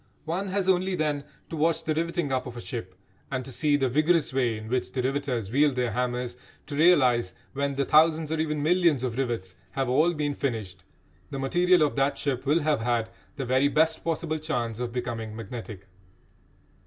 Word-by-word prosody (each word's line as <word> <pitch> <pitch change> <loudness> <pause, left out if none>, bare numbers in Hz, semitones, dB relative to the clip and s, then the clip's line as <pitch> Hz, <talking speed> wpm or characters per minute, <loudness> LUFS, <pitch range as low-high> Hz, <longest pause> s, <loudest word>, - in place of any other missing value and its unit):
One 180 +5 -2
has 190 0 -1
only, 185 0 +2
then, 150 -3 -1 0.3
to - - -3
watch 160 +1 +1
the 155 - 0
riveting 170 -2 -1
up 130 -1 -1
of 120 -1 -8
a - - -4
ship, 110 -9 -6 0.4
and 130 -2 -2
to 135 - -8
see 145 +3 +2
the 135 -2 +2
vigorous 155 +3 +2
way 125 -4 +1
in 110 0 -8
which 125 +2 -1
the 130 - -2
riveters 130 -6 -1
wield 145 +1 +3
their 125 -2 0
hammers, 125 +1 -2 0.3
to 145 - -6
realise 130 - +4
that - - -30 0.2
when 140 0 -1
the 140 0 0
thousands 155 +1 +4
or 160 - -1
even 150 -2 -1
millions 170 -5 +3
of 125 -1 -2
rivets 115 -8 -2 0.2
have 135 -2 -1
all 160 +7 +3
been 145 -1 -1
finished 110 -10 -4 0.5
the 135 - -5
material 175 +5 +3
of 150 - +1
that 135 +1 +2
ship 135 -1 -2
will 155 +4 +3
have 150 -2 +1
had 120 -1 0 0.2
the 135 - -4
very 130 +3 +3
best 160 +2 +2
possible 160 -1 -1
chance 120 -7 -2
of 125 -1 -3
becoming 115 -3 -4
magnetic. 110 -3 -7
140 Hz, 200 wpm, -27 LUFS, 120-155 Hz, 0.5 s, realise